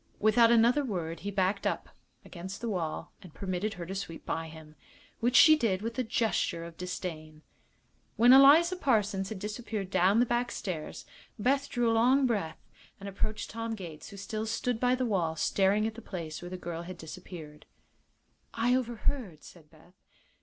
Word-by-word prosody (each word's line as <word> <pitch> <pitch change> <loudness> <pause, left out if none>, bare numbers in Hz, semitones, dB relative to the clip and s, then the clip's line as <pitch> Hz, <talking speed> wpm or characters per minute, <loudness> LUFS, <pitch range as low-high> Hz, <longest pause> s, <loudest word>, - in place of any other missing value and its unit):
Without 220 +2 +5
another 235 +5 +4
word 170 - -4
he 205 - -5
backed 200 0 0
up - - -3 0.4
again; 180 +1 -8
the 235 - -4
wall 170 -5 -3
and 180 -5 -14
permitted 195 +2 -3
her 175 -2 -6
to 190 - -6
sweep 190 -4 -6
by 165 0 -3
him, 155 -1 -13 0.4
which 240 +2 +1
she 310 -1 +9
did 215 -9 0
with 230 +2 -4
a - - +2
gesture 220 -7 0
of 170 0 -9
disdain. 160 -4 -6 0.7
When 240 +2 +7
Eliza 310 +7 +7
Parsons 210 - +1
had 220 - -5
disappeared 210 -1 -5
down 195 +5 +3
the 245 - +4
back 240 0 -1
stairs 170 -6 -5 0.3
Beth 275 +5 +1
drew 240 -1 +1
a - - +2
long 255 +4 +4
breath 200 -10 -1 0.4
and 200 - -8
approached 215 +2 -3
Tom 230 0 -4
Gates, 170 -7 -9
who 200 - -11
still 215 +3 -4
stood 225 +1 -1
by 250 +1 +3
the 255 0 -1
wall 175 -8 0
staring 195 +5 +2
at 220 - -2
the 230 - -10
place 165 -7 -6
where 175 - -7
the 185 - -6
girl 170 -2 -5
had 180 +1 -8
disappeared. 160 -2 -10 0.9
"I 235 +2 +2
overheard," 240 - -2
said 160 -4 -15
Beth. 165 +3 -21
200 Hz, 180 wpm, -30 LUFS, 175-235 Hz, 0.9 s, she